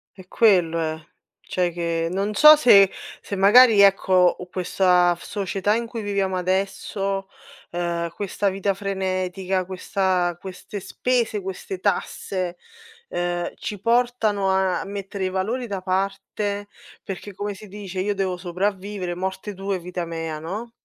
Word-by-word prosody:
È 185 Hz, -1 st, -14 dB
quello 180 Hz, -8 st, +3 dB
è, 160 Hz, -1 st, -2 dB, 0.4 s
cioè 180 Hz, -2 st, -1 dB
che 165 Hz, -1 st, -1 dB
non 200 Hz, +3 st, -1 dB
so 305 Hz, +5 st, +9 dB
se 200 Hz, -10 st, +6 dB, 0.3 s
se 200 Hz, -, -5 dB
magari 210 Hz, +3 st, +7 dB
ecco 190 Hz, -2 st, +5 dB
questa 180 Hz, -1 st, +3 dB
f -, -, -15 dB
società 200 Hz, 0 st, -1 dB
in 235 Hz, 0 st, -1 dB
cui 230 Hz, -1 st, -6 dB
viviamo 195 Hz, -2 st, -1 dB
adesso 195 Hz, +1 st, -2 dB, 0.4 s
ehm, 170 Hz, -1 st, -2 dB
questa 200 Hz, +1 st, -2 dB
vita 195 Hz, +1 st, -1 dB
frenetica, 190 Hz, -1 st, -2 dB
questa 185 Hz, -1 st, -1 dB
queste 190 Hz, +2 st, -8 dB
spese, 235 Hz, +1 st, -1 dB
queste 190 Hz, 0 st, -6 dB
tasse, 185 Hz, -2 st, -2 dB, 0.5 s
ehm, 175 Hz, 0 st, -2 dB
ci 205 Hz, -2 st, -6 dB
portano 230 Hz, -4 st, +1 dB
a 190 Hz, -1 st, +1 dB
mettere 200 Hz, -1 st, -5 dB
i 185 Hz, -, -1 dB
valori 215 Hz, +7 st, -2 dB
da 200 Hz, -4 st, -4 dB
parte 195 Hz, +2 st, -2 dB, 0.3 s
perché, 195 Hz, +1 st, -7 dB
come 205 Hz, +2 st, -4 dB
si 205 Hz, +2 st, -12 dB
dice: 195 Hz, -2 st, -6 dB
"Io 205 Hz, 0 st, 0 dB
devo 190 Hz, -2 st, -1 dB
sopravvivere 185 Hz, +1 st, -3 dB
morte 190 Hz, +3 st, -4 dB
tue 195 Hz, 0 st, -3 dB
vita 180 Hz, 0 st, -5 dB
mea 165 Hz, -2 st, -4 dB
no? 210 Hz, +9 st, -6 dB
190 Hz, 140 wpm, -23 LUFS, 180-205 Hz, 0.5 s, so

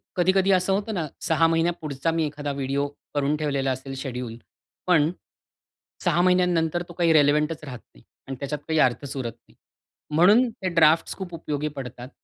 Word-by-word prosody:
कधी-कधी 185 Hz, +2 st, +3 dB
असं 185 Hz, +1 st, +2 dB
होतं 210 Hz, +2 st, -1 dB
ना, 165 Hz, -5 st, -2 dB
6 165 Hz, 0 st, +3 dB
महिन्या 165 Hz, +1 st, +2 dB
पुढचा 150 Hz, +1 st, -2 dB
मी 160 Hz, -1 st, 0 dB
एखादा 145 Hz, -1 st, -4 dB
व्हिडिओ 140 Hz, +1 st, -1 dB, 0.3 s
करून 145 Hz, +1 st, +1 dB
ठेवलेला 140 Hz, -3 st, -1 dB
असेल 130 Hz, +1 st, -5 dB
शेड्यूल. 125 Hz, -4 st, -5 dB, 0.5 s
पण 165 Hz, -2 st, +4 dB, 0.9 s
6 175 Hz, -1 st, +2 dB
महिन्यानंतर 175 Hz, -2 st, +2 dB
तो 175 Hz, -, -9 dB
काही 170 Hz, -1 st, +2 dB
रेलेव्हंटच 150 Hz, +1 st, +3 dB
राहत 125 Hz, -5 st, -7 dB, 0.2 s
नाही -, -, -19 dB, 0.2 s
आणि 135 Hz, -, -4 dB
त्याच्यात 145 Hz, +1 st, -3 dB
काही 160 Hz, -1 st, +1 dB
अर्थच 130 Hz, +2 st, +1 dB
उरत 120 Hz, -3 st, -3 dB, 0.2 s
नाही. -, -, -24 dB, 0.6 s
म्हणून 210 Hz, +9 st, +5 dB
ते 190 Hz, -4 st, -4 dB
ड्राफ्ट्स 160 Hz, 0 st, +4 dB
खूप 185 Hz, -3 st, -7 dB
उपयोगी 150 Hz, -2 st, -3 dB
पडतात 125 Hz, -1 st, -7 dB
155 Hz, 165 wpm, -24 LUFS, 140-175 Hz, 0.9 s, म्हणून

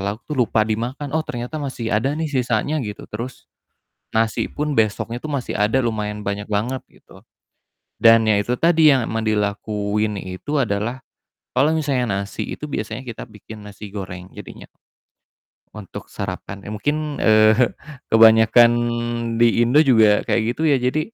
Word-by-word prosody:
lauk 100 Hz, +3 st, -4 dB
tuh 150 Hz, -, -7 dB
lupa 110 Hz, -2 st, +2 dB
dimakan. 120 Hz, +6 st, -3 dB
“Oh, 160 Hz, -, +1 dB
ternyata 125 Hz, +6 st, -5 dB
masih 125 Hz, -6 st, -4 dB
ada, 135 Hz, +7 st, 0 dB
nih, 160 Hz, -1 st, -3 dB
sisanya,” 125 Hz, +4 st, 0 dB
gitu. 105 Hz, -5 st, -6 dB
Terus 120 Hz, +4 st, -7 dB, 0.7 s
nasi 110 Hz, 0 st, 0 dB
pun 150 Hz, 0 st, -3 dB
besoknya 115 Hz, +1 st, -1 dB
itu 155 Hz, -, -6 dB
masih 140 Hz, -4 st, -3 dB
ada, 105 Hz, +5 st, +1 dB
lumayan 105 Hz, -2 st, -3 dB
banyak 100 Hz, +1 st, -4 dB
banget, 115 Hz, +5 st, -1 dB
gitu. -, -, -19 dB, 0.8 s
Dan 115 Hz, 0 st, +6 dB
ya 105 Hz, -2 st, +3 dB
itu 120 Hz, +4 st, -1 dB
tadi, 165 Hz, 0 st, +4 dB
yang 125 Hz, -, -1 dB
emang 110 Hz, 0 st, -2 dB
dilakuin 105 Hz, 0 st, -1 dB
itu 95 Hz, +10 st, -5 dB
adalah 120 Hz, +1 st, -2 dB, 0.5 s
kalau 135 Hz, +4 st, +3 dB
misalnya 125 Hz, -10 st, 0 dB
nasi, 100 Hz, -, -6 dB
itu -, -, -6 dB
biasanya 115 Hz, -3 st, -5 dB
kita 120 Hz, -3 st, -7 dB
bikin 105 Hz, 0 st, -12 dB
nasi 105 Hz, 0 st, -10 dB
goreng 95 Hz, -2 st, -7 dB
jadinya. -, -, -11 dB, 1.1 s
Untuk 105 Hz, -3 st, -9 dB
sarapan, 100 Hz, 0 st, -6 dB
eee, 105 Hz, -, -7 dB
mungkin, 145 Hz, +8 st, -1 dB, 0.2 s
eee, 110 Hz, 0 st, +5 dB, 0.6 s
kebanyakan 115 Hz, +1 st, +6 dB, 0.7 s
di 120 Hz, -, +6 dB, 0.2 s
Indo 125 Hz, +6 st, +4 dB
juga 110 Hz, -7 st, +4 dB
kayak -, -, +2 dB
gitu -, -, -6 dB
ya. -, -, +5 dB
Jadi, 125 Hz, +5 st, 0 dB
110 Hz, 155 wpm, -21 LUFS, 105-130 Hz, 1.1 s, Dan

